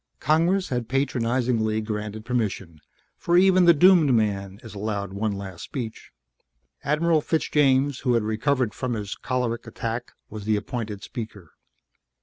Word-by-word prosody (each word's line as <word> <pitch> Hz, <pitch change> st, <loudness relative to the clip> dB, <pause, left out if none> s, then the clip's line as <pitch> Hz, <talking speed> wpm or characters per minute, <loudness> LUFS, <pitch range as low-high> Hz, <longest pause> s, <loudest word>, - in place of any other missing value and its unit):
Congress 170 Hz, +6 st, +2 dB
had 120 Hz, -3 st, -2 dB
patronizingly 120 Hz, -4 st, 0 dB
granted 105 Hz, 0 st, -5 dB
permission, 100 Hz, -9 st, -3 dB, 0.4 s
for 170 Hz, 0 st, +2 dB
even 185 Hz, -1 st, +5 dB
the 170 Hz, -, +8 dB
doomed 170 Hz, -2 st, +5 dB
man 100 Hz, -3 st, -1 dB
is 110 Hz, -, -10 dB
allowed 100 Hz, -2 st, -3 dB
one 105 Hz, +2 st, -1 dB
last 95 Hz, -3 st, -7 dB
speech. 115 Hz, -5 st, -6 dB, 0.7 s
Admiral 155 Hz, +2 st, +2 dB
Fitzjames, 145 Hz, -4 st, +2 dB
who 125 Hz, -3 st, +1 dB
had 115 Hz, -, +2 dB
recovered 115 Hz, +2 st, 0 dB
from 125 Hz, -1 st, -3 dB
his 105 Hz, -2 st, -4 dB
choleric 125 Hz, -2 st, -3 dB
attack, 115 Hz, +1 st, -5 dB
was 105 Hz, -1 st, -8 dB
the 110 Hz, 0 st, +2 dB
appointed 105 Hz, -1 st, -4 dB
speaker. 110 Hz, -8 st, -8 dB
115 Hz, 135 wpm, -24 LUFS, 105-140 Hz, 0.7 s, the